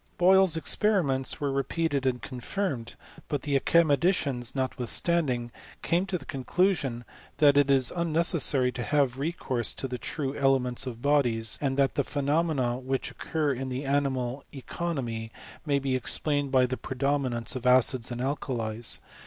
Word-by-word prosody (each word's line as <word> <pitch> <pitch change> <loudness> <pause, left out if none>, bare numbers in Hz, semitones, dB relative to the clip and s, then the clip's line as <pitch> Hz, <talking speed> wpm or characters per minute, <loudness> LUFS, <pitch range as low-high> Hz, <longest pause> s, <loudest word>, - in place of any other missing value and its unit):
Boyle's 185 -1 +5
experiments 160 -6 +1
were 145 -1 -1
re* 135 0 +1
peated 145 -3 -1
and 125 -2 -1
confirmed; 135 0 -4 0.3
but 145 -3 -3
the 145 -1 -1
academicians, 145 -4 +2
not^ 130 -1 -2
withstanding, 125 -2 +1 0.3
came 175 +3 +1
to 190 -2 -1
the - - -13
conclusion, 135 -4 -1 0.3
that 145 -2 +5
it 145 -1 +4
is 135 -2 +4
un 170 -2 -2
necessary 150 -5 +4
to 125 - -6
have 135 -1 0
recourse 135 -6 -2
to 135 - -4
the 125 -1 -5
true 140 0 -4
elements 130 -2 +1
of 120 -1 -7
bodies; 120 -6 +2
and 135 -2 -1
that 135 -1 +2
the 140 - 0
phenomena 140 -3 0
which 130 0 -3
occur 150 -3 -2
in 130 +1 -5
the 130 +2 -4
animal 135 -2 -1
economy 130 -6 -4 0.4
may 140 -1 +2
be 135 -1 -1
explained 145 +2 0
by 130 -1 +4
the 130 +1 -3
predomi* 135 +1 -1
nance 115 0 -3
of 125 -1 -3
acids 125 -1 +3
or - - -3
alkalies. 120 -4 -2
135 Hz, 160 wpm, -27 LUFS, 125-150 Hz, 0.4 s, Boyle's